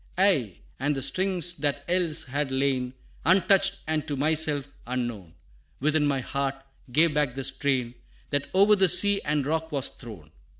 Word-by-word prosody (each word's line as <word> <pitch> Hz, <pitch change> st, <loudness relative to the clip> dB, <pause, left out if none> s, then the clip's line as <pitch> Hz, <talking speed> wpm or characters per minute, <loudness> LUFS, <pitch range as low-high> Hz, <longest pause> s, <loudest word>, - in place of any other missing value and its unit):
Aye, 150 Hz, -, +2 dB, 0.2 s
and 145 Hz, +3 st, 0 dB
the 135 Hz, -, -2 dB
strings 180 Hz, +2 st, +1 dB
that 145 Hz, -1 st, -2 dB
else 175 Hz, -3 st, 0 dB
had 140 Hz, +2 st, -3 dB
lain 130 Hz, -1 st, -1 dB, 0.3 s
Untouched, 195 Hz, +2 st, +3 dB
and 155 Hz, -1 st, -2 dB
to 145 Hz, -, -2 dB
myself 150 Hz, -1 st, +1 dB, 0.2 s
unknown, 120 Hz, -9 st, -4 dB, 0.4 s
Within 150 Hz, +1 st, +1 dB
my 135 Hz, -2 st, 0 dB
heart, 140 Hz, +1 st, -3 dB, 0.4 s
gave 160 Hz, +4 st, +3 dB
back 145 Hz, -4 st, 0 dB
the 135 Hz, -, -4 dB
strain 130 Hz, -2 st, 0 dB, 0.4 s
That 145 Hz, -1 st, -1 dB
o'er 200 Hz, +2 st, +6 dB
the 190 Hz, -1 st, +3 dB
sea 205 Hz, +3 st, +5 dB
and 145 Hz, -2 st, -1 dB
rock 160 Hz, +2 st, -2 dB
was 140 Hz, -3 st, -1 dB
thrown. 105 Hz, -, -12 dB
145 Hz, 160 wpm, -26 LUFS, 135-170 Hz, 0.4 s, o'er